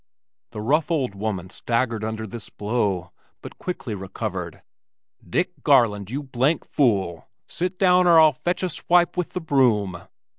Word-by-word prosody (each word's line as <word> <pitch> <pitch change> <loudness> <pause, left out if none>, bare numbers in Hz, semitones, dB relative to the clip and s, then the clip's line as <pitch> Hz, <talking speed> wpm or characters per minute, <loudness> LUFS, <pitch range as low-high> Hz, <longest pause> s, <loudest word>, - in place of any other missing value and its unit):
The 110 -2 -7
rough 150 +9 +1
old 140 - 0
woman 100 -3 -4
staggered 115 -1 -1
under 110 0 -3
this 110 +1 -8
blow, 105 -5 -2 0.3
but - - -10
quickly 140 -10 -4
recovered. 95 -3 -5 0.6
"Dick - - -1
Garland, 105 -4 +3
you 140 +5 -4
blank 135 +4 0
fool. 95 - 0 0.2
Sit 180 +1 -3
down, 180 -1 +4
or 170 -2 +7
I'll 155 -1 +7
fetch 175 +7 -2
you - - +3
a - - -1
swipe 175 +1 +2
with 180 -2 -3
the 180 - -3
broom." 115 - +1
120 Hz, 155 wpm, -23 LUFS, 105-160 Hz, 0.6 s, or